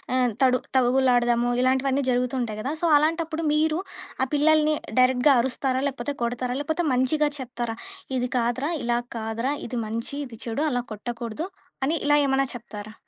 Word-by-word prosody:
ఆహ్, 250 -2 +2
తడు 255 -1 +4 0.2
తగువులాడదాము 245 -2 +3
ఇలాంటివన్నీ 265 +2 +2
జరుగుతుంటాయి 245 -3 -1
గదా! 275 +5 -2
సో, - - +1
అలాంటప్పుడు, 320 +1 0
మీరు 310 +2 +2 0.4
ఆ - - 0
పిల్లలని 305 +1 +4 0.2
డైరెక్ట్‌గా 255 +3 +5
అరుస్తారా? 260 +1 -1
లేపోతే 265 +1 -4
కొడతారా? 245 +1 -2
లేపోతే 315 +4 -1
మంచిగా 295 +4 +2
చెప్తారా? 240 -3 -4 0.4
ఇది 250 0 -1
కాదురా! 245 +6 0
ఇలా 240 0 +1 0.2
కాదురా! 225 +4 -2
ఇది 240 0 -3
మంచి, 230 +5 -4
ఇది 235 -4 -11
చెడు 240 +5 -1
అలా 245 -1 0
కొట్టకూడదు 235 - -5 0.4
అని 300 +5 +1
ఇలా 295 - +5
ఏమైనా 270 0 +2
చెప్తారా? 215 -3 -8
255 Hz, 145 wpm, -25 LUFS, 240-285 Hz, 0.4 s, డైరెక్ట్‌గా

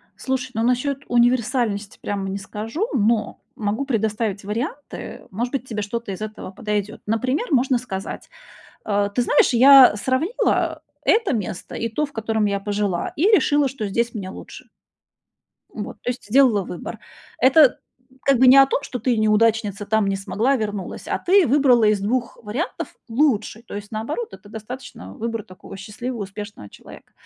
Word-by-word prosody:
Слушай, 260 -1 -3
ну, 225 - -1
насчёт 260 +3 0
универсальности 240 -3 +1
прямо 195 -1 -3
не 195 - -3
скажу, 225 - -4
но 220 0 +1 0.2
могу 215 +5 -2
предоставить 215 -4 -1
варианты. 245 +7 -5
Может 235 +6 -3
быть, 260 -2 -3
тебе 215 -3 -3
что-то 220 +1 -4
из 190 - -7
этого 215 -3 -6
подойдёт. 210 +1 -3
Например, 255 - 0
можно 260 -1 +3
сказать: 205 -6 -6 0.6
э, 205 -1 +1
ты 245 - +2
знаешь, 290 - +3
я 260 -2 +8
сравнила 260 - 0 0.2
это 445 -6 +2
место 205 -6 -4
и 230 - -2
то, 230 +7 -1
в 285 - -19
котором 220 -1 -1
я 200 -1 -1
пожила, 200 -3 -2
и 305 - -2
решила, 295 -9 +4
что 245 -5 -5
здесь 235 +4 -1
мне 195 -4 -5
лучше. - - -11 1.1
Вот, - - -6
то - - -3
есть 250 0 -5
сделала 230 -2 +4
выбор. 175 - -7 0.4
Это 270 +1 +5 0.5
как 275 -3 +4
бы 260 - +6
не 255 - +9
о 270 - +9
том, 275 +1 -2
что 250 - -5
ты, 255 - +1
и - - -3
неудачница, 215 -1 +2
там 220 -1 +1
не 195 - 0
смогла, 220 +7 0
вернулась, 205 -5 -4
а - - -1
ты 380 -1 +4
выбрала 255 -3 +4
из 210 -1 +3
2 235 +4 -2
вариантов 235 - -4
лучший. 225 -4 +1
То - - -9
есть, 205 0 -7
наоборот, 285 - -4
это 205 - -13
достаточно 220 - -9
выбор 230 -1 -4
такого 185 +1 -12
счастливого, 220 +4 -6
успешного 200 - -9
человека. - - -15
225 Hz, 165 wpm, -22 LUFS, 205-260 Hz, 1.1 s, не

